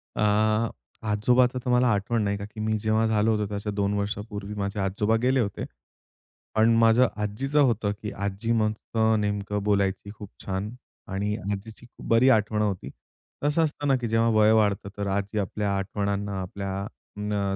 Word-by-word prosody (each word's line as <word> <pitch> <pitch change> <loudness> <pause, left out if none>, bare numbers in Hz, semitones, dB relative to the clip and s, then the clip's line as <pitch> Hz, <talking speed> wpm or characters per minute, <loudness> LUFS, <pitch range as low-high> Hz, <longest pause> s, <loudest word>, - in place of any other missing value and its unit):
अ, 110 +2 +2 0.4
आजोबाचं 125 +4 +3
तर - - -1
मला 125 +1 +4
आठवण 105 +1 +1
नाही 100 0 0
का 100 - -6
की 110 +1 -12
मी 110 0 0
जेव्हा 110 +1 +1
झालो 110 0 +2
होतो 105 -1 +1
त्याच्या 105 +1 -4
2 100 0 0
वर्षापूर्वी 105 0 -4
माझे 100 0 -3
आजोबा 100 +3 +1
गेले 130 +1 +3
होते. 100 -4 -2 0.9
पण 110 +1 +5
माझ्या 115 +2 +5
आजीचं 135 +8 0
होतं 115 -6 +2
की 105 - -4
आजी 100 +3 -3
मग 110 -2 +2 0.2
अ, 110 0 +4
नेमकं 105 0 -2
बोलायची 100 -1 0
खूप 105 -2 -10 0.2
छान 95 +2 -2 0.4
आणि 105 +2 -1 0.2
आजीची 110 +4 -6 0.2
बरी 115 +3 +5
आठवण 110 -2 +2
होती. 100 -4 -2 0.5
कस 145 +3 +1
असतं 150 -2 0
ना 135 - +4
की 120 -2 -3
जेव्हा 115 +1 +2
वय 105 0 +6
वाढतं, 105 -3 +2
तर 100 -1 -2
आजी 100 +2 -1
आपल्या 100 0 -1
आठवणांना 100 0 -2
अ, - - -2
आपल्या 95 +1 -4 0.3
न 100 -2 -1
105 Hz, 170 wpm, -26 LUFS, 100-115 Hz, 0.9 s, वय